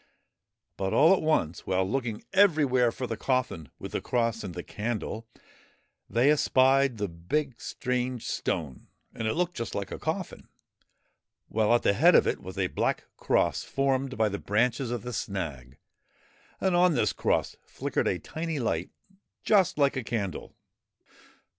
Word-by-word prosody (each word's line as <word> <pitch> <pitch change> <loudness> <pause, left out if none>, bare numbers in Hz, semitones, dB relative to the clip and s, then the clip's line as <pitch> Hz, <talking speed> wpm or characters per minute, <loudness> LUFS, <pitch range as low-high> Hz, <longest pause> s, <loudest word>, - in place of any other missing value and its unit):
But 95 0 -1
all 160 +5 +6
at 195 - +1
once, 120 - 0
while 95 0 +1
looking 115 -1 -2
everywhere 150 -11 +4
for 130 - -5
the 115 - -3
coffin 125 - -1
with - - -8
the - - -2
cross 115 -2 0
and 95 -4 -6
the 90 - -5
candle, 110 0 -4 0.8
they 120 +7 +4
espied 135 -3 +3
the 105 -1 -1
big, 115 - -3
strange 125 -1 -2
stone, 70 -6 -3 0.3
and 110 - -3
it 110 - 0
looked 175 +1 0
just 115 - -4
like - - -4
a - - -5
coffin; - - -4 1.0
while 110 0 +1
at 120 - +1
the - - +4
head 165 - +5
of - - +6
it - - -1
was 95 +1 -9
a 95 - +1
black - - -1
cross - - +1
formed 135 -1 -1
by 110 -1 +3
the 100 -1 -3
branches 120 +4 0
of 120 -3 -3
the 125 - -5
snag, 80 - -5 0.8
and 190 -2 +1
on 175 -2 +4
this 110 -5 +1
cross - - 0
flickered - - -2
a - - +1
tiny 160 -1 -4
light 120 -4 -1 0.5
just 195 -7 +3
like 140 -1 +3
a 135 - -2
candle. 100 -7 -4
120 Hz, 160 wpm, -28 LUFS, 105-135 Hz, 1.0 s, all